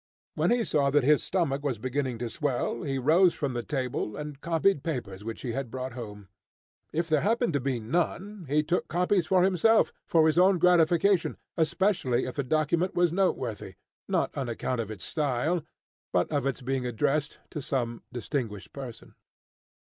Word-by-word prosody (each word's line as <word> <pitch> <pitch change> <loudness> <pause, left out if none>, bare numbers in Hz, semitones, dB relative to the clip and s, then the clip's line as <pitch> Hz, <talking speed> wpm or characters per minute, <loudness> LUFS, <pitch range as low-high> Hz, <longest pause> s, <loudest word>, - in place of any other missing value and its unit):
When - - +1
he 240 -1 +3
saw 145 -8 +2
that 145 0 +3
his 150 +2 +4
stomach 160 -7 0
was 135 -5 -1
beginning 130 +1 -2
to 120 0 -4
swell, 130 -4 -1
he 135 -2 -2
rose 165 +7 +4
from 140 -3 -2
the 120 - -2
table, 125 -5 -3
and 150 -2 -7
copied 165 0 +2
papers 115 - -4
which 115 +1 -6
he 125 - -2
had 130 +1 -3
brought 130 0 -5
home. 105 -5 -8 0.6
If 165 +1 -1
there 155 -3 +2
happened 230 -2 +1
to 140 - +2
be 130 -2 -1
none, 175 - -2
he 150 +2 +3
took 175 +4 -1
copies 180 0 +1
for 185 +1 +4
himself, 195 +4 +4
for 160 -2 +4
his 160 +2 +3
own 185 +1 +5
gratification, 175 +1 +3 0.2
especially 160 -6 +1
if 130 - -5
the 140 - -1
document 155 +6 +1
was 175 -2 +3
noteworthy, 125 - -1 0.3
not - - 0
on 130 -3 -2
account 120 +2 -2
of 110 - -6
its 105 -4 -7
style, 150 +3 0 0.5
but 90 - +1
of 145 -2 0
its 135 -2 -2
being 130 +1 -1
addressed 140 +5 0
to 150 - -4
some 120 -4 -2
distinguished 120 -5 -4
person. 130 -4 -9
145 Hz, 180 wpm, -28 LUFS, 125-170 Hz, 0.6 s, own